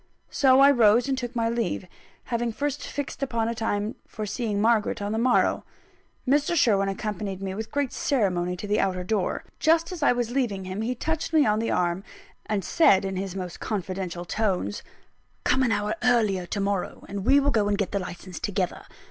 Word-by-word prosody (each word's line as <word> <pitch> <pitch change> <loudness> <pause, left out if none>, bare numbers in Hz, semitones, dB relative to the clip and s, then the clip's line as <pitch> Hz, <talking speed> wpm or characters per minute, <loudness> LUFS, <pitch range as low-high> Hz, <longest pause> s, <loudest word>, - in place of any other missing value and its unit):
So 265 -1 +5
I 280 +1 +8
rose 235 -1 +4
and 270 - +1
took 245 -1 -5
my 230 -1 +1
leave, 230 -4 -1 0.4
having 235 -1 -1
first 285 +4 -3
fixed 285 0 -5
a 275 - 0 0.3
time 215 -1 -1
for 215 - -5
seeing 210 -1 -2
Margaret 220 0 +2
on 205 0 -3
the 220 - 0
morrow. 245 +1 +2 0.6
Mr. 290 +5 +2
Sherwin 200 -9 +3
accompanied 195 -1 -4
me 195 -1 -4
with 220 +3 -5
great 285 -3 -1
ceremony 180 -8 0
to 195 - -6
the 205 +1 +1
outer 185 -2 0
door. 200 0 -1 0.2
Just 330 +3 +3
as 355 -3 -6
I 285 - +5
was 240 -1 -1
leaving 230 -8 -1
him, 185 +3 -4
he 245 +3 -1
touched 320 +5 -3
me 310 -2 +5
on 210 0 +2
the 230 - -1
arm, 175 +1 0 0.4
and 205 -3 -1
said 200 - +4
in 190 0 -3
his 190 0 -4
most 180 -2 -5
confidential 185 -3 -4
tones: 185 - -1 0.6
"Come 260 - +2
an 250 -3 +2
hour 205 +1 0
earlier, 215 -7 +2
to 205 - -3
morrow; 200 -2 -2
and 200 -1 -5
we'll 280 +5 +4
go 210 -4 +2
and 205 0 +1
get 200 - -1
the 200 - 0
licence 180 -1 -7
together. 190 -3 -2
215 Hz, 195 wpm, -26 LUFS, 195-250 Hz, 0.6 s, I